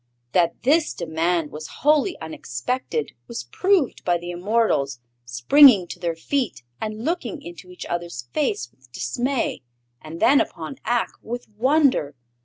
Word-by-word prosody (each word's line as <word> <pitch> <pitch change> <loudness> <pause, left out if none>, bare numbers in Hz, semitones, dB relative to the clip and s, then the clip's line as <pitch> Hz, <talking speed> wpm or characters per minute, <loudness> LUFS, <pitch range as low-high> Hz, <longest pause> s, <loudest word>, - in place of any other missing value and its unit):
That 170 0 +1
this 305 +5 +3
demand 165 -1 -1
was 155 +1 -7 0.2
wholly 305 +5 +3
unexpected 245 - -3 0.2
was 235 -1 -5
proved 375 -8 +1
by 175 -1 +2
the 175 +1 -6
immortals 175 - 0 0.3
springing 185 - +6
to - - -7
their 170 -2 -2
feet 250 - -2 0.2
and 215 +2 -4
looking 325 - -2
into 175 +1 -10
each 180 - -9
other's 170 -8 -4
face 125 -4 -1
with 130 +1 -26
dismay 240 - -2 0.4
and 160 +2 -9
then 280 +1 +5
upon 275 - -5
Ak 240 -1 +1
with 245 +2 -6
wonder. 255 - +2
180 Hz, 140 wpm, -23 LUFS, 160-260 Hz, 0.4 s, springing